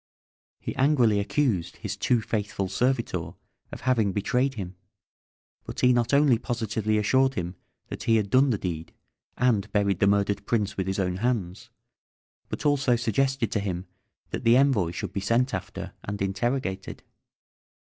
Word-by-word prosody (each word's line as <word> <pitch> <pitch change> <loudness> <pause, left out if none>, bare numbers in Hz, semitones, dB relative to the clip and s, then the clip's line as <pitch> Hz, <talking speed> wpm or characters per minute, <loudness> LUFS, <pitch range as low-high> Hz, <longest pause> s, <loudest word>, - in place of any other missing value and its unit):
He - - -5
angrily 130 -7 +3
accused 100 - 0
his - - -4
too 120 -2 +1
faithful 105 -3 -2
servitor 115 -4 -1 0.4
of - - -8
having 115 -7 +2
betrayed 125 +7 0
him, 95 -4 -6 0.9
but - - -6
he 125 0 +5
not 120 0 +1
only 140 -4 +4
positively 110 -3 -1
assured 130 +5 +2
him 90 -2 -3 0.4
that - - -6
he 115 -2 +4
had 105 -3 0
done 135 +2 +5
the 115 - +1
deed, 85 -4 -5 0.4
and 120 -6 +1
buried 100 -3 +1
the 100 - +4
murdered 100 0 +1
prince 105 -4 0
with 95 -1 -2
his 95 - -1
own 90 -2 -1
hands, 105 -5 -2 0.8
but - - -5
also 145 -4 +3
suggested 120 +2 0
to 105 - 0
him 95 -2 -3 0.5
that - - -4
the 115 +1 +6
envoy 130 -11 +3
should 85 - -5
be - - -1
sent 115 +5 +1
after 95 -1 -5
and 100 0 -5
interrogated. 100 0 -2
110 Hz, 160 wpm, -26 LUFS, 100-125 Hz, 0.9 s, the